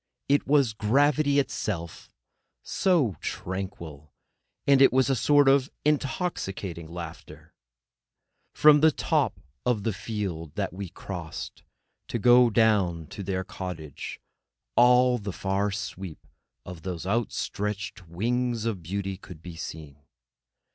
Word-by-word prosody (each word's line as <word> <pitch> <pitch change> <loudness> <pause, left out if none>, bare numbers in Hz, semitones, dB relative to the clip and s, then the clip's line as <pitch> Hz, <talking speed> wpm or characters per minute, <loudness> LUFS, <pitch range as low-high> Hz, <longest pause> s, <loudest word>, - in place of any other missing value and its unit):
It 145 +1 +2
was 140 -5 +3
gravity 140 +7 +2
itself, 90 - -2 0.5
so 150 - +1
tranquil; 85 -6 -6 0.5
and 140 -1 +5
it 135 - +7
was 130 +1 +3
a - - +3
sort 145 +4 +4
of 135 0 +4 0.2
intoxicating 120 - -2
laughter. 85 -1 -9 1.0
From 150 -1 +6
the 160 - +7
top - - 0 0.5
field 95 -6 -5
that - - -2
we 95 -1 -6
crossed 85 -3 -7 0.5
to - - -2
go 120 +2 +6
down 100 -7 +2
to - - -7
their 95 -1 -2
cottage, 90 -6 -7 0.6
all 125 0 +5
the 100 -1 -4
far 95 +2 -1
sweep 95 -4 -6 0.4
of 90 -2 -8
those 90 -2 -5
outstretched 105 -2 -2
wings 120 +6 -1
of 110 -6 -2
beauty 95 +3 -3
could 90 -4 -12
be 85 -2 -8
seen. 75 -3 -8
100 Hz, 115 wpm, -27 LUFS, 90-125 Hz, 1.0 s, it